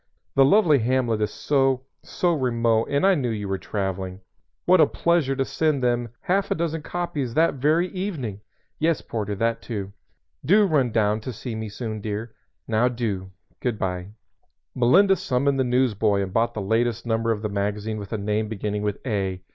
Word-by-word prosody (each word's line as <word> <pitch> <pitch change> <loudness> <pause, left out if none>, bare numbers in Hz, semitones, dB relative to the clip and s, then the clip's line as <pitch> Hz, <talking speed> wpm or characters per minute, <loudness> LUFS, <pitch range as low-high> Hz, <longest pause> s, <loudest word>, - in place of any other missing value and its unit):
The 135 - +5
lovely 155 -1 +5
hamlet 120 -2 +1
is 105 - +1
so 135 -3 +1 0.2
so 175 -1 0
remote, 115 -5 +1
and 145 +4 +2
I 195 - +6
knew 135 -8 0
you 105 -3 -3
were 95 0 -2
traveling. 95 -2 -4 0.4
What 180 -1 +6
a 150 - +6
pleasure 170 -5 +1
to 135 0 0
send 155 -4 0
them 120 -1 +1
half 195 +2 0
a - - +1
dozen 160 -1 -2
copies 150 -7 -3
that 165 +1 +4
very 160 +5 +3
evening! 155 - -4 0.4
Yes, 160 0 +1
porter, 105 -2 -3
that, 115 +3 0
too 100 -4 -5 0.5
Do 205 +8 +5
run 140 -9 +2
down 105 0 +1
to 130 - -5
see 120 +1 -6
me 110 -1 -4
soon, 110 0 -5
dear 110 +2 -4 0.3
Now 115 +2 +2
do. 110 -6 -3 0.3
Good 120 -4 -1
by!" 90 -2 -3 0.7
Melinda 185 +11 +5
summoned 135 -2 0
the - - +4
newsboy 115 -5 +2
and 95 -1 -6
bought 115 +1 +1
the 105 - -2
latest 115 +3 0
number 115 0 0
of 110 -1 -2
the 105 - -1
magazine 105 +2 -2
with 100 -1 -8
a 110 - -1
name 105 +1 -1
beginning 105 -1 -3
with 105 -1 -1
"A." 95 -5 -2
115 Hz, 185 wpm, -24 LUFS, 105-140 Hz, 0.7 s, I